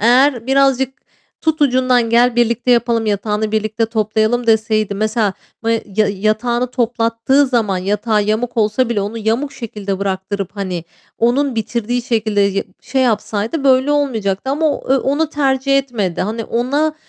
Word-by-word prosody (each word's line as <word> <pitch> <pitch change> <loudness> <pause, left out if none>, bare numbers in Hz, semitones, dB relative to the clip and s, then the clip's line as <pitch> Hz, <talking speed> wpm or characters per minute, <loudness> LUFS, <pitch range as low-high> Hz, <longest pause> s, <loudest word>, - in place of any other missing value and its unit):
Eğer 245 +2 +3
birazcık, 270 0 +2 0.4
"Tut 315 -1 0
ucundan, 255 -3 +2
gel 240 +1 +3
birlikte 240 +1 +1
yapalım, 235 -2 +2
yatağını 210 +1 -1
birlikte 220 +1 0
toplayalım." 220 +2 0
deseydi 215 -2 +2
mesela 215 0 0 0.3
ma 230 - 0
ya 230 - +1 0.3
yatağını 220 +5 0
toplattığı 235 +3 +1
zaman 225 -7 0
yatağı 210 +3 0
yamuk 220 +4 -1
olsa 225 +3 +1
bile 230 -4 0
onu 210 +3 -4
yamuk 230 +6 -1
şekilde 205 -5 -5
bıraktırıp, 195 0 -3
hani, 180 -4 -4 0.3
onun 255 +3 +1
bitirdiği 235 +2 -2
şekilde 220 -4 0
ye 200 0 +1 0.2
şey 265 0 -1
yapsaydı 225 +3 -1
böyle 265 +1 +4
olmayacaktı 240 -6 -1
ama 305 +3 +1
o, 265 - -5
eee, - - +5
onu 290 +4 0
tercih 275 -2 +1
etmedi. 230 -10 -2
Hani, 220 +3 -3
ona 285 +8 0
230 Hz, 145 wpm, -17 LUFS, 215-255 Hz, 0.4 s, eee